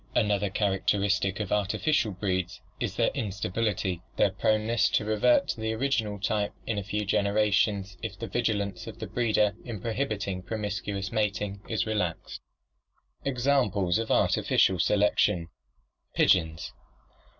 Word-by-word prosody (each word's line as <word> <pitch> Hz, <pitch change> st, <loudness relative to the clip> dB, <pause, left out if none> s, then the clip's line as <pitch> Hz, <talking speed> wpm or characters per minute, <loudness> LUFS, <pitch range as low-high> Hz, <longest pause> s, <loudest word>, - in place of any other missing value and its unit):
Another 105 Hz, -1 st, +2 dB
characteristic 100 Hz, 0 st, +1 dB
of 105 Hz, -3 st, -3 dB
artificial 110 Hz, +4 st, +1 dB
breeds 95 Hz, -2 st, -2 dB, 0.2 s
is -, -, -2 dB
their -, -, +2 dB
instability, 100 Hz, -3 st, -2 dB
their 100 Hz, -, +3 dB
proneness 110 Hz, +3 st, +2 dB
to 105 Hz, -, +1 dB
revert 120 Hz, -, +3 dB
to 110 Hz, -, -3 dB
the 110 Hz, 0 st, -1 dB
original 110 Hz, -4 st, -1 dB
type 105 Hz, 0 st, -1 dB
in 110 Hz, -3 st, -1 dB
a -, -, -5 dB
few 105 Hz, +2 st, -2 dB
generations 100 Hz, -1 st, +1 dB
if 105 Hz, -3 st, -5 dB
the 115 Hz, -, -5 dB
vigilance 100 Hz, -3 st, -2 dB
of -, -, -8 dB
the -, -, -5 dB
breeder 105 Hz, -4 st, +1 dB
in 115 Hz, -5 st, -6 dB
prohibiting 110 Hz, -4 st, -2 dB
promiscuous 100 Hz, -1 st, -3 dB
mating 105 Hz, -2 st, -1 dB
is 110 Hz, -4 st, 0 dB
re 110 Hz, -, -1 dB
laxed. 90 Hz, -5 st, -3 dB, 0.9 s
Examples 120 Hz, -9 st, +1 dB
of 115 Hz, -, -3 dB
Artificial 95 Hz, -2 st, +3 dB
Selection 90 Hz, -3 st, +2 dB, 0.7 s
Pigeons. 80 Hz, -3 st, +2 dB
105 Hz, 130 wpm, -28 LUFS, 95-110 Hz, 0.9 s, their